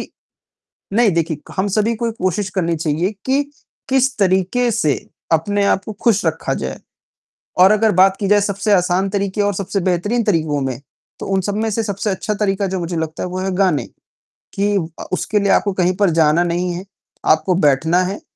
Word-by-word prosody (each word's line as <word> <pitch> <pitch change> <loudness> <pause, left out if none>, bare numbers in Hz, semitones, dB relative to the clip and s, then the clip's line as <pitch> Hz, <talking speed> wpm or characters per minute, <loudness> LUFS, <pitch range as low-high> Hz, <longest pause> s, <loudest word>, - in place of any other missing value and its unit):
कि - - -8 0.8
नहीं 225 -1 +4
देखिए 165 -2 -1
क - - -12
हम 190 +2 +1
सभी 215 +3 +1
को 235 +2 -3
ये - - -1
कोशिश 185 +2 0
करनी 170 -3 0
चाहिए 160 +4 -1
कि, 270 +2 +2 0.5
किस 265 0 +2
तरीके 190 +6 +2
से 155 -10 +1 0.4
अपने 200 +6 +1
आप 195 - +2
को 215 - -5
खुश 220 -4 +3
रखा - - -1
जाए - - -4 0.8
और 185 +2 +7
अगर 215 +1 +3
बात 190 +1 +5
की 200 - -2
जाए 205 +1 +4
सबसे 200 +1 -1
आसान 180 +1 +2
तरीके 200 +1 -1
और 205 0 +1
सबसे 200 +2 -2
बेहतरीन 190 +7 0
तरीकों 160 -8 0
में, 130 -2 -3 0.4
तो - - -5
उन 195 -1 +1
सब 205 +2 -3
में 220 +1 0
से 225 +2 -1
सबसे 200 0 -3
अच्छा 200 +2 -2
तरीका 200 -1 0
जो 190 0 -3
मुझे 170 0 -3
लगता 160 -1 -3
है, 180 - -3
वो 185 +1 -4
है 190 +1 -2
गाने 185 -6 +1 0.7
कि 205 +1 0 0.3
अ, - - -5
उसके 210 +3 0
लिए 200 0 +2
आपको 200 - +2
कहीं 185 -1 +1
पर 200 -2 +3
जाना 160 0 +3
नहीं 175 +1 -1
है, 180 +2 -6 0.4
आपको 160 +4 +3
बैठना 160 +6 +3
है 195 +3 -4
190 Hz, 205 wpm, -18 LUFS, 175-205 Hz, 0.8 s, और